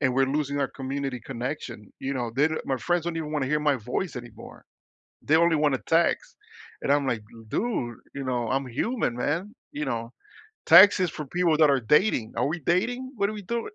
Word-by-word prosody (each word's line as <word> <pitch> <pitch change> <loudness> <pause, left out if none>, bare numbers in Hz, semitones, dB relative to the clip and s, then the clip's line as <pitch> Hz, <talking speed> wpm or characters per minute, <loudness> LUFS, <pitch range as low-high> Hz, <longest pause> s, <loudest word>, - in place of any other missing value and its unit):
and 130 -3 +2
we're 135 0 +3
losing 145 0 -1
our 135 - 0
community 135 -1 -4
connection. 120 -4 -6
You 135 +1 -3
know, 120 -3 -2
the 155 +4 +1
my 135 - -1
friends 175 +4 0
don't 170 -1 -3
even 155 -2 -4
want 150 -3 0
to - - -3
hear 150 +1 +1
my 145 -2 +2
voice 125 - -4
anymore. 120 -3 -10 0.6
They 155 - +3
only 170 0 +4
want 150 -2 +2
to - - -6
text 165 +1 +1 0.5
and - - 0
I'm 145 -1 +2
like, 110 -4 -1 0.3
"Dude, 125 - -2 0.2
you 140 - -5
know, 120 -3 -2
I'm 135 0 0
human, 210 - -1
man. 165 - -2 0.2
You 150 +1 -4
know, 115 -2 -3 0.6
text 185 +4 +8
is 180 -3 +1
for 150 -2 -7
people 175 0 +1
that 155 - +6
are 135 -2 +2
dating. 125 - +2
Are 120 - +1
we 165 +2 -3
dating? 245 - -1
What 200 0 +1
are - - -6
we 205 - -7
doing?" 235 - -3
145 Hz, 215 wpm, -26 LUFS, 130-170 Hz, 0.6 s, text